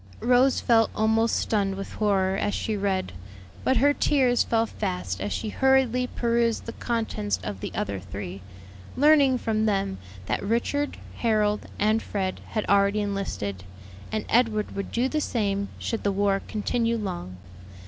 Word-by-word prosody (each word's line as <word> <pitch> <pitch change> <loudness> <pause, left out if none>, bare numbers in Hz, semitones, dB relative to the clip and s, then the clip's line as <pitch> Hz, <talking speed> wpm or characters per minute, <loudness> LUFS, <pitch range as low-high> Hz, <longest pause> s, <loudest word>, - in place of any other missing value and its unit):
Rose 250 +2 +4
felt 225 -2 +3
almost 220 +1 +2
stunned 200 -3 0
with 195 0 -6
horror 195 -3 +1
as 205 - -1
she 220 - -2
read; 195 - -1 0.5
but 260 - +2
her 285 +4 +4
tears 260 -5 +3
fell 225 0 +1
fast 90 - -4
as 100 +1 -2
she 220 - -2
hurriedly 260 0 +2
perused 235 -1 0
the 230 - -6
contents 220 - -2
of 95 0 -5
the - - -5
other 100 -1 -2
three, 95 0 -7 0.6
learning 285 -2 +5
from 220 -2 0
them 195 - 0 0.3
that - - -1
Richard, 240 +7 -1 0.2
Harold, 210 -2 +1
and 215 +2 +2
Fred 190 -2 -3
had 215 - -2
already 200 +1 +3
enlisted, 195 - -3 0.5
and 215 -1 -2
Edward 225 -3 +1
would 200 - -4
do 245 +2 +1
the 305 +3 -1
same 200 -6 -1
should 225 - -3
the 200 - +2
war 195 0 +1
continue 230 +2 0
long. 90 - -5
215 Hz, 155 wpm, -26 LUFS, 195-235 Hz, 0.6 s, learning